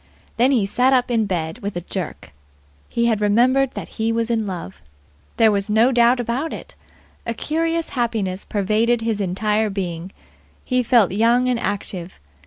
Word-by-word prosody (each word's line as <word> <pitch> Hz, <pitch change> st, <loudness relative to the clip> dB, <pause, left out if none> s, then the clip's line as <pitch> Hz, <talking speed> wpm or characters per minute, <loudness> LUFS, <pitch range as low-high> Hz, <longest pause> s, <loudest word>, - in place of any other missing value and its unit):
Then 245 Hz, +3 st, +4 dB
he 245 Hz, -7 st, +2 dB
sat 250 Hz, +6 st, +2 dB
up 250 Hz, -1 st, +2 dB
in 225 Hz, -3 st, +1 dB
bed 170 Hz, +1 st, -3 dB
with 200 Hz, -4 st, -4 dB
a -, -, -3 dB
jerk. 180 Hz, -, -6 dB, 0.6 s
He 235 Hz, -, 0 dB
had 220 Hz, -3 st, +1 dB
remembered 250 Hz, +6 st, +3 dB
that -, -, -5 dB
he 225 Hz, +1 st, +1 dB
was 230 Hz, 0 st, -1 dB
in 220 Hz, -2 st, 0 dB
love. 170 Hz, -, -7 dB, 0.6 s
There 225 Hz, -2 st, +5 dB
was 200 Hz, 0 st, -1 dB
no 225 Hz, +4 st, +4 dB
doubt 240 Hz, 0 st, +4 dB
about 245 Hz, +7 st, -2 dB
it. -, -, -8 dB, 0.5 s
A 230 Hz, -, -2 dB
curious 330 Hz, +4 st, -1 dB
happiness 220 Hz, -7 st, -2 dB
pervaded 220 Hz, +4 st, +1 dB
his 225 Hz, -2 st, -1 dB
entire 210 Hz, +3 st, 0 dB
being. 180 Hz, -2 st, -4 dB, 0.5 s
He 255 Hz, -1 st, +1 dB
felt 235 Hz, -6 st, +3 dB
young 235 Hz, +5 st, +3 dB
and 250 Hz, -2 st, +1 dB
active. 190 Hz, -4 st, -4 dB
225 Hz, 170 wpm, -21 LUFS, 200-245 Hz, 0.6 s, There